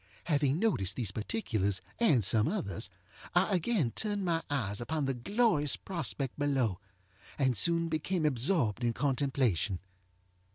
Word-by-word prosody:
Having 145 +1 +1
noticed 135 - +1
these 115 -7 -2
particulars, 105 - -1 0.2
and 155 - +4
some 105 +3 +3
others, 165 - -2 0.5
I 190 +3 +3
again 175 - +1
turned 205 - -2
my 165 -2 +1
eyes 110 -7 -1
upon 145 +5 -2
the 135 - 0
glorious 150 - +2
prospect 150 -7 -3
below, 130 -10 +1 0.6
and 130 -3 +2
soon 170 - +3
became 160 +2 -1
absorbed 130 - +1
in 120 -1 +1
contemplation. 130 - +1
140 Hz, 130 wpm, -31 LUFS, 115-170 Hz, 0.6 s, and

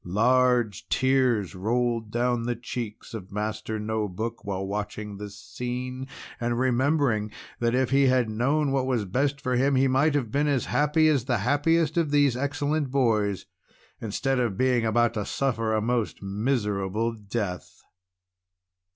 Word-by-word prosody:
Large 115 -2 +2
tears 130 -7 +2
rolled 115 +3 -1
down 120 +1 0
the 120 - 0
cheeks 115 -2 -6
of 100 -4 -7
Master 110 +1 -3
No 110 0 -1
Book 110 +5 -5
while 95 -1 -3
watching 105 +1 -4
this 100 -1 -8
scene, 125 +7 -5 0.3
and 120 0 -1
remembering 130 -3 +1 0.3
that 120 0 +1
if 130 0 +1
he 135 0 +4
had 125 -2 +3
known 135 +7 +1
what 135 -1 0
was 120 -5 0
best 140 +8 0
for 130 -2 -1
him, 135 +3 +2
he 135 +1 +4
might 140 +3 +2
have 125 -7 -1
been 145 +4 +1
as 140 -4 +1
happy 150 +2 +2
as 140 -6 +2
the 125 -3 +1
happiest 155 +4 +2
of 165 -3 +2
these 145 -3 +3
excellent 145 +2 -1
boys, 110 -7 +1 0.5
instead 130 +5 -1
of 115 -6 -1
being 125 -3 +2
about 120 +1 +2
to 105 -3 -2
suffer 115 -2 -1
a 110 0 +1
most 115 -3 -1
miserable 105 0 -1
death. 105 -4 -5
120 Hz, 155 wpm, -26 LUFS, 105-135 Hz, 0.5 s, he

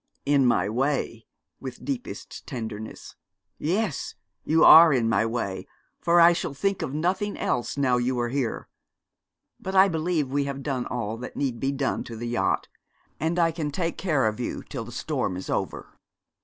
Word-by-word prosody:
'In 140 -2 +4
my 120 - +2
way' 125 0 -1 0.3
(with 130 -2 -8
deepest 265 -3 -6
tenderness): 110 -5 -7 0.4
'yes, 180 - -1 0.3
you 160 +1 +3
are 165 0 +10
in 120 -5 +2
my 115 0 +2
way, 100 -5 -3 0.3
for 175 0 +3
I 170 +1 +8
shall 165 -4 -3
think 195 +7 -1
of - - -3
nothing 185 +7 -1
else 125 +3 -1
now 130 -3 +2
you 125 +1 0
are 120 0 0
here. 130 -3 -2 0.9
But 190 +1 -5
I 190 +1 +7
believe 160 -3 0
we 140 0 +1
have 140 0 -5
done 135 -4 -2
all 115 -2 -3
that 125 +2 -8
need 130 -5 -1
be 135 +3 0
done 140 -1 -1
to 115 - -8
the 120 +2 -5
yacht, 120 0 0 0.5
and 165 +2 -1
I 165 -1 +3
can 160 -2 -3
take 165 +3 -3
care 155 -9 +1
of 110 +1 -1
you 120 - -4
till 120 -5 -6
the 120 - -10
storm 125 - -2
is 95 - -6
over.' - - -3
135 Hz, 180 wpm, -26 LUFS, 120-165 Hz, 0.9 s, are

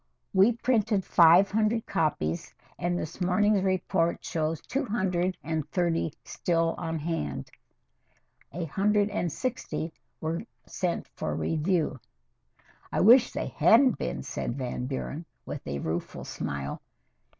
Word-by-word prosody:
"We 195 +5 +5
printed 220 -4 +1
five 175 +3 +6
hundred 220 +2 +1
copies, 85 - -1 0.2
and 175 0 0
this 170 +2 -6
morning's 200 +3 +3
report 185 -2 0
shows 160 0 -1
two 275 +3 -2
hundred 190 -6 0
and 155 0 -2
thirty 170 -3 0
still 165 -1 0
on 165 0 -2
hand. 145 - -3 1.0
A 170 +3 -3
hundred 205 +5 +2
and 175 -5 -1
sixty 170 - -3 0.3
were 160 +1 -2 0.2
sent 180 -2 -2
for - - -4
review." 160 -3 0 0.9
"I - - +1
wish 240 +5 +7
they - - -3
hadn't 250 +2 +5
been," 65 +1 -3
said 120 - -4
Van 125 -1 -3
Buren, 140 +4 -4 0.2
with - - -7
a 70 0 -2
rueful 80 +4 -4
smile. 70 0 -4
175 Hz, 130 wpm, -28 LUFS, 155-200 Hz, 1.0 s, wish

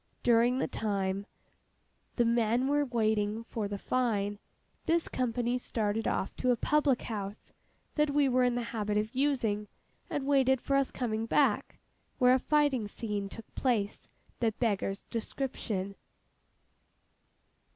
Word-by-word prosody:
During 240 +1 +4
the 265 - 0
time 200 -1 -2 0.9
the 240 - +3
men 235 +2 +2
were 290 +1 +2
waiting 220 -3 0
for 225 -2 -3
the 200 0 -4
fine, 205 -4 0 0.5
this 335 0 +2
company 245 0 -1
started 220 -2 -1
off - - -1
to 255 - 0
a 245 - +5
public 290 +1 +2
house 205 -2 -6 0.4
that 300 -1 +2
we 285 -1 +3
were 255 -1 +3
in 245 -1 +2
the 245 - -1
habit 210 -2 0
of 215 +3 -1
using, 245 -7 +1 0.4
and 280 - -2
waited 265 -2 +4
for 275 - 0
us 275 -1 +3
coming 225 -2 -2
back, - - +2 0.4
where 250 0 +5
a 260 - +4
fighting 285 -6 +2
scene 205 -2 -4
took 225 +2 -10
place 220 -6 0 0.4
that 225 -3 0
beggars 200 -4 -1
description. 220 -5 -3
235 Hz, 140 wpm, -31 LUFS, 210-255 Hz, 0.9 s, a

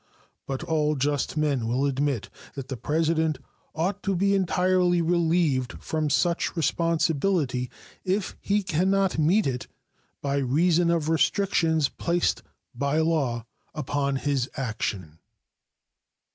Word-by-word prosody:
But 135 +3 -3
all 155 -3 +1
just 145 +2 -1
men 140 -6 +1
will 125 +4 +1
admit 140 -3 -1 0.2
that 135 -1 -7
the 135 - -3
President 160 +2 0 0.4
ought 185 +5 -1
to 195 -1 -1
be 200 +3 +2
entirely 180 -1 +2
relieved 165 -7 +1
from 155 -1 -2
such 170 +5 +1
responsibility 160 -5 0 0.3
if 190 +1 -1
he 205 +1 +1
can 185 +1 +1
not 195 -4 +1
meet 180 +8 +3
it 125 -2 -2 0.5
by 140 0 -1
reason 165 +6 +2
of 165 -3 +1
restrictions 160 -2 +2
placed 175 +4 0 0.3
by 140 +4 -1
law 145 -8 0 0.3
upon 140 -1 -1
his 135 -1 -1
action. 100 - -4
155 Hz, 120 wpm, -26 LUFS, 135-175 Hz, 0.5 s, meet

